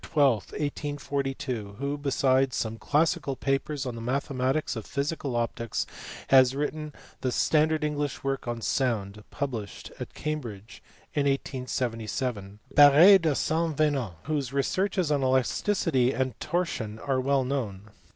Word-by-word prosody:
12, 140 -4 +4 0.2
1842, 140 -6 -3
who, 140 +2 -2
besides 135 -2 +2
some 110 0 -3
classical 145 +3 +1
papers 135 +1 -1
on 125 - -3
the 115 - -7
mathematics 130 +3 -1
of 110 - -5
physical 140 -2 -2
optics, 115 -1 -2 0.4
has 130 -1 +6
written 150 +1 -3 0.3
the 130 - -1
standard 155 +4 +2
English 145 -2 -2
work 135 -2 -2
on 120 -1 -3
sound, 105 -5 -1
published 120 -8 -5
at - - -7
Cambridge 115 -9 -5 0.3
in 145 -2 +1
1877. 125 -5 -2 0.2
Barre 150 +7 +8
de 160 -5 +1
Saint 160 0 0
Venant, 140 - +1
whose 145 -4 -2
researches 180 +5 0
on 145 -2 +2
elasticity 130 - +2
and 130 -1 -1
torsion 125 -12 -2
are 130 +1 -1
well 135 0 +2
known. 110 -6 -4
135 Hz, 130 wpm, -27 LUFS, 120-145 Hz, 0.4 s, Barre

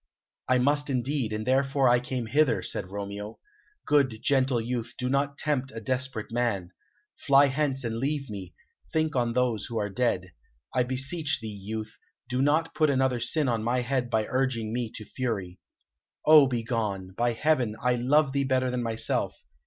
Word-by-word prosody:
"I 130 - +5
must 145 +3 +2
indeed, 130 -2 -1
and 110 0 -3
therefore 135 -1 +3
came 125 -1 -4
I 110 - -11
hither," 150 0 +3
said - - -2
Romeo. 100 +2 -6 0.5
"Good, 135 -6 +2
gentle 130 -3 +2
youth, 120 0 -4
do 125 -1 -2
not 140 +1 0
tempt 140 -4 -1
a - - -4
desperate 125 -1 -2
man. 115 -7 -1 0.5
Fly 140 +1 +5
hence 140 -1 0
and 115 -1 -2
leave 140 +2 -2
me; 95 -4 -8 0.4
think 155 -2 0
on 120 -2 +1
those 120 -4 0
who 115 - -4
are 105 -1 -1
dead. 95 -6 0 0.4
I 125 - +2
beseech 135 +5 0
thee, 110 -2 -6
youth, 110 +2 -6 0.3
do 125 +1 -1
not 155 +4 +2
put 155 -1 +2
another 130 -2 +2
sin 145 +5 +1
on 115 -3 0
my 125 +2 +1
head 125 0 -1
by 110 -2 +1
urging 125 -4 -1
me 120 -2 -2
to 110 - -7
fury. 100 -7 -4 0.7
Oh, 155 -3 +8
begone! 115 -6 -2
By 120 +1 +1
heaven, 125 -4 +1
I 125 +1 +2
love 135 +4 +3
thee 140 0 +1
better 130 -1 +1
than 125 0 -1
myself. 115 -1 -1
125 Hz, 175 wpm, -27 LUFS, 110-135 Hz, 0.7 s, Oh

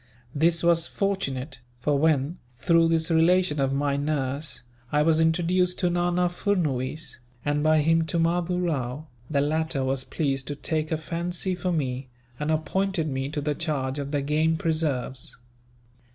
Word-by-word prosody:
This 165 +3 +2
was 170 -1 +3
fortunate; 140 -9 -2 0.2
for 145 +4 +1
when, 155 +2 +2 0.2
through 165 +6 +4
this 165 0 +1
relation 165 -1 +3
of 135 0 +1
my 140 0 0
nurse, 145 -1 -2 0.3
I 150 0 +3
was 160 0 +3
introduced 175 +2 +2
to 180 -1 +1
Nana 175 0 +2
Furnuwees, 160 - -1 0.3
and 145 0 +1
by 155 0 +4
him 165 +1 +2
to 170 - -1
Mahdoo 175 +2 +1
Rao, 150 -5 -2 0.2
the 140 -3 +2
latter 155 -1 0
was 130 0 -1
pleased 135 0 -2
to 145 - -3
take 155 +1 -2
a 160 - +1
fancy 175 +3 -2
for 180 0 -2
me, 130 -5 -2 0.3
and 150 +1 -2
appointed 160 +3 0
me 135 0 -2
to 150 0 -3
the 150 +1 0
charge 145 -4 -2
of 140 -1 -4
the 145 -1 -1
game 155 +3 +2
preserves. 150 -6 -1
155 Hz, 160 wpm, -26 LUFS, 140-170 Hz, 0.3 s, through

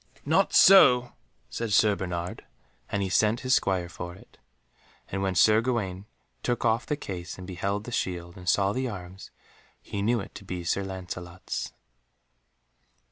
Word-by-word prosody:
"Not - - +3
so," 125 -11 +7 0.4
said 115 -2 -3
Sir 105 0 +4
Bernard, 90 -2 -5 0.5
and 100 -2 -1
sent 110 +2 +3
his 130 0 +1
Squire 95 -3 +1
for 85 0 -8
it. 95 - -19 0.7
And 95 - -3
when 95 -1 -1
Sir 110 +6 +5
Gawaine 105 -6 -2 0.3
took 120 -1 -1
off 115 +1 +1
the 150 - 0
case 90 -8 -6
and 95 - -9
beheld 100 +2 -3
the 120 - -8
shield, 85 -5 -3
and 90 -1 -4
saw 100 0 +2
the 130 +1 -2
arms, 95 -2 -9 0.5
he 100 - -5
knew 115 +3 +2
it 95 - -8
to - - -10
be 90 -2 -5
Sir 100 +4 0
Lancelot's. 90 -2 -6
100 Hz, 155 wpm, -27 LUFS, 90-110 Hz, 0.7 s, so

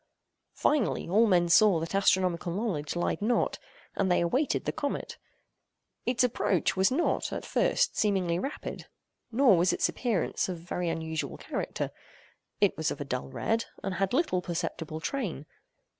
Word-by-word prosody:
Finally, 290 -7 +1
all 215 +6 +4
men 175 -3 +4
saw 185 +1 +5
that 165 +3 -5
astronomical 185 -3 +2
knowledge 175 -7 -2
lied 175 +4 -1
not, 235 +4 +1 0.4
and 190 -2 +1
they 180 - +4
awaited 255 - 0
the - - 0
comet. 285 -2 -4 0.9
Its 245 0 +2
approach 205 -7 +1
was 190 0 +4
not, 300 +7 0
at - - -4
first, - - +1
seemingly 185 -5 +1
rapid; 275 +9 -5 0.4
nor 240 -3 +5
was 175 +1 +3
its - - +2
appearance 220 -7 -1
of 180 - -3
very 175 +1 -3
unusual 160 -1 -3
character. - - -4 0.7
It - - +3
was - - 0
of - - -5
a - - -4
dull 70 - -3
red, 225 - -1 0.2
and 195 - -2
had 195 0 0
little 260 - +1
perceptible 165 -2 -4
train. 195 - -3
190 Hz, 155 wpm, -29 LUFS, 170-230 Hz, 0.9 s, saw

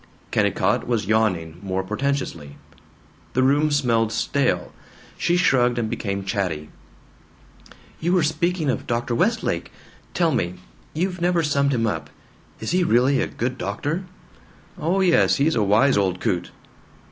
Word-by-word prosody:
Kennicott - - +1
was 115 -4 0
yawning, 90 -7 0
more 95 -1 -2
portentously. 105 - -3 0.8
The 130 - +2
room 145 +3 +3
smelled 115 -6 +1
stale. 140 +2 0 0.4
She 175 - +1
shrugged 125 -8 +3
and 115 -2 -1
became 100 -2 -3
chatty: 90 -7 -2 1.3
"You 170 +3 0
were 180 -3 +3
speaking 160 0 0
of - - -5
Dr. 120 0 -1
Westlake. 225 - 0 0.4
Tell 170 -2 +2
me 90 - -1 0.4
you've 180 +2 -2
never 175 -1 +2
summed 140 -2 +1
him 115 -4 +1
up: 80 -9 -3 0.5
Is - - -3
he 180 +1 +2
really 130 0 +3
a - - 0
good 125 +2 -3
doctor?" 145 - -3 0.7
"Oh 180 +5 0
yes, 180 -3 +4
he's 150 +3 +2
a 115 - +1
wise 105 +7 +4
old 95 -2 +1
coot." 90 -1 -1
125 Hz, 140 wpm, -23 LUFS, 100-155 Hz, 1.3 s, yes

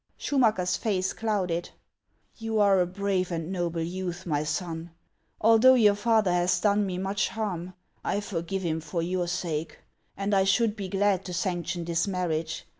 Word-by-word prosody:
Schumacker's 215 -10 +1
face 190 -4 -1
clouded: 185 -6 -1 0.3
" - - -43
You 225 -1 -2
are 200 -2 +5
a 180 - +2
brave 185 -1 -1
and 165 +1 -3
noble 170 -3 -1
youth, 180 +1 -4
my 150 -3 0
son. 165 +1 -3 0.5
Although 230 +4 +6
your 215 -4 +5
father 210 -3 +2
has 180 +1 +2
done 205 -1 +2
me 180 -1 -3
much 195 +2 0
harm, 185 -5 -4 0.3
I 205 - 0
forgive 190 -1 -3
him 160 -2 -1
for 165 +1 -3
your 180 0 -1
sake; 165 -3 -3 0.4
and 200 +1 -1
I 195 -1 +4
should 210 +3 +2
be 200 -3 -5
glad 195 -1 +1
to 180 - -5
sanction 175 -1 -2
this 170 +2 0
marriage. 165 -4 -2
185 Hz, 170 wpm, -27 LUFS, 175-205 Hz, 0.5 s, Although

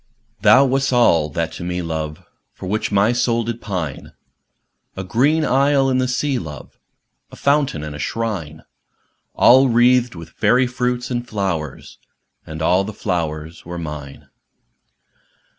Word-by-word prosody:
Thou 135 +2 +6
wast 135 +1 +1
that 125 - 0
all 85 -11 +4
to 85 +3 -4
me, 90 0 -3
love, 80 -2 -5 0.3
For - - -9
which 105 +4 -2
my 100 +3 +3
soul 120 -1 +1
did 115 +1 -5
pineâ 85 -9 -5 0.8
A 95 - -3
green 140 - +2
isle 135 0 +3
in 130 - +1
the 130 - +1
sea, 130 +1 -1
love, 75 -4 -10 0.5
A - - -11
fountain 140 - +1
and 75 -1 -6
a - - -8
shrine, 90 -8 -4 0.7
All 130 +2 +6
wreathed 120 -1 +3
with 85 -1 -10
fairy 125 +1 +2
fruits 125 0 -2
and 120 0 -3
flowers, 90 - -4 0.5
And 80 0 -6
all 90 +4 +3
the 105 +2 -6
flowers 80 -4 -4
were 85 +1 -7
mine. 75 -4 -8
105 Hz, 145 wpm, -20 LUFS, 80-125 Hz, 0.8 s, Thou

